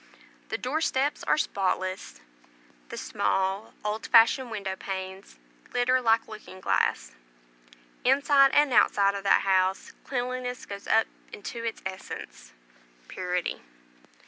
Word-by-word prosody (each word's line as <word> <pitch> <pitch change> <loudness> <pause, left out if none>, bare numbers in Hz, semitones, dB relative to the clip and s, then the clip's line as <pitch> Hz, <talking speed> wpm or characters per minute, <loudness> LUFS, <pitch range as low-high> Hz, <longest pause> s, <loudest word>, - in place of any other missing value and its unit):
The - - -2
door 295 +6 -2
steps 285 -1 0
are - - +3
spotless; 185 - -2 0.7
the - - -7
small 195 +3 -1
old 210 +1 -2
fashioned 235 +2 +5
window 200 -4 -4
panes 190 - -7 0.3
glitter 255 +1 +2
like 225 -1 +2
looking 215 -3 -11
glass. - - 0 0.9
Inside 275 +1 +5
and 290 -3 +4
outside 200 -3 +4
of 200 - -4
that - - +5
house 190 0 +1
cleanliness 250 -1 -3
goes 200 0 -8
up 225 - +4 0.3
into 230 +3 -7
its 230 -1 -4
essence, 190 0 -8 0.6
purity. 180 -1 -3
215 Hz, 120 wpm, -27 LUFS, 190-250 Hz, 0.9 s, fashioned